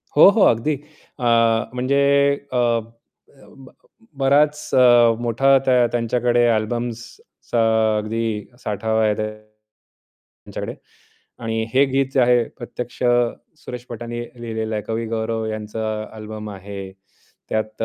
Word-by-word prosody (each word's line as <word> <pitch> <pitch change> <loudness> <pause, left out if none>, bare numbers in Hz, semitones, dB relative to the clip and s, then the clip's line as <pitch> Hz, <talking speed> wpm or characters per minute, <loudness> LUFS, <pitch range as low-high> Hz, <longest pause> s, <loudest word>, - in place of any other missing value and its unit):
हो, 155 - +9
हो. 205 0 +2
अगदी 120 +7 +2 0.4
अ, - - -6 0.5
म्हणजे 130 +3 0 0.5
अ, - - +1
अ, 115 -1 -4 0.7
बराच 150 +2 +2
अ, 120 -2 +6
मोठा 135 +4 +3
त्या 125 -2 +4
त्यांच्याकडे 120 0 +1
अल्बम्सचा 120 +1 -2 0.3
अगदी 115 +2 -2 0.4
साठा 105 +1 -3
आहे 105 -1 +3
त्यांच्याकडे 110 0 -8 1.7
आणि 115 0 -1
हे 140 +2 +6
गीत 135 0 +1
जे 130 - +4
आहे 120 -1 +4 0.2
प्रत्यक्ष 120 +1 -7 0.6
सुरेश 125 0 -7
भटांनी 120 0 -5 0.2
लिहिलेलं 110 -1 -4
आहे. 105 - -2
कवी 115 +1 -3
गौरव 110 0 -2
यांचा 110 0 -4 0.3
अल्बम 110 0 -7
आहे. 100 0 -8 0.6
त्यात 110 0 -3
अ, - - +2
115 Hz, 115 wpm, -21 LUFS, 110-125 Hz, 1.7 s, हो